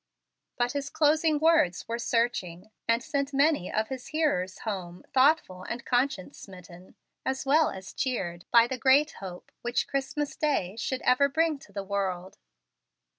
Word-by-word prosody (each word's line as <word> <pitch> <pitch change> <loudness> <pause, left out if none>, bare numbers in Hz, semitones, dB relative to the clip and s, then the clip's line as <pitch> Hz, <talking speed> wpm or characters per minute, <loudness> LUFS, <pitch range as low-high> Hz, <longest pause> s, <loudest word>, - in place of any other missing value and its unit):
But 245 -1 +1
his 280 -1 -3
closing 310 +1 +3
words 310 - +3
were 230 +1 -3
searching, 220 -6 -1 0.2
and 230 +1 +2
sent 280 -1 -2
many 280 - +2
of 220 0 -1
his 260 -2 -6
hearers 285 - 0
home 180 -5 -5
thoughtful 260 - +3
and 235 +6 -6
conscience 245 -6 -1
smitten, 180 -1 -13 0.3
as 265 +1 -2
well 300 +3 +4
as 190 0 -9
cheered 175 -10 -3
by 235 -1 +6
the 255 +1 -4
great 275 +5 +4
hope 180 -2 -9
which 240 +1 -1
Christmas 280 +2 -2
day 245 - 0
should 255 +3 -3
ever 280 +3 +4
bring 315 0 +1
to 210 - -17
the 200 0 -4
world. 190 -2 -3
245 Hz, 155 wpm, -28 LUFS, 190-280 Hz, 0.3 s, by